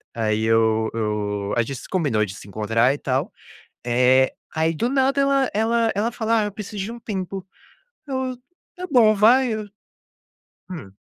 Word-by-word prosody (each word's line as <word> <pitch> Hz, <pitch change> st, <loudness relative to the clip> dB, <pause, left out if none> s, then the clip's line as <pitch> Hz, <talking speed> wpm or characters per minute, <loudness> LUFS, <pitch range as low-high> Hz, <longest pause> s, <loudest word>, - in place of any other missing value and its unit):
aí 110 Hz, -1 st, 0 dB
eu 110 Hz, 0 st, +2 dB
eu 105 Hz, -2 st, -2 dB
a -, -, +4 dB
gente 135 Hz, +3 st, -6 dB
se -, -, -12 dB
combinou 145 Hz, -, +1 dB
de 95 Hz, -1 st, -8 dB
se 100 Hz, -, -12 dB
encontrar 115 Hz, +5 st, +1 dB
e -, -, -5 dB
tal, -, -, -1 dB, 0.5 s
eh, 125 Hz, +2 st, +3 dB, 0.2 s
aí 160 Hz, +1 st, +1 dB
do 235 Hz, +10 st, 0 dB
nada 275 Hz, +1 st, +2 dB
ela 275 Hz, -1 st, +2 dB
ela 225 Hz, +1 st, +1 dB
ela 215 Hz, +4 st, 0 dB
fala: 225 Hz, -1 st, +1 dB
"Ah, -, -, +1 dB
eu 210 Hz, -, -4 dB
preciso 210 Hz, -1 st, -6 dB
de 215 Hz, -, -5 dB
um 235 Hz, -, -9 dB
tempo", 190 Hz, -3 st, -5 dB, 0.6 s
eu: 260 Hz, -1 st, -2 dB, 0.4 s
"Tá 365 Hz, 0 st, -5 dB
bom, 230 Hz, -5 st, +5 dB
vai. 235 Hz, +4 st, +4 dB
"Eu 215 Hz, -1 st, -4 dB, 1.0 s
"Hum. 135 Hz, -, -8 dB
190 Hz, 175 wpm, -22 LUFS, -, 1.0 s, bom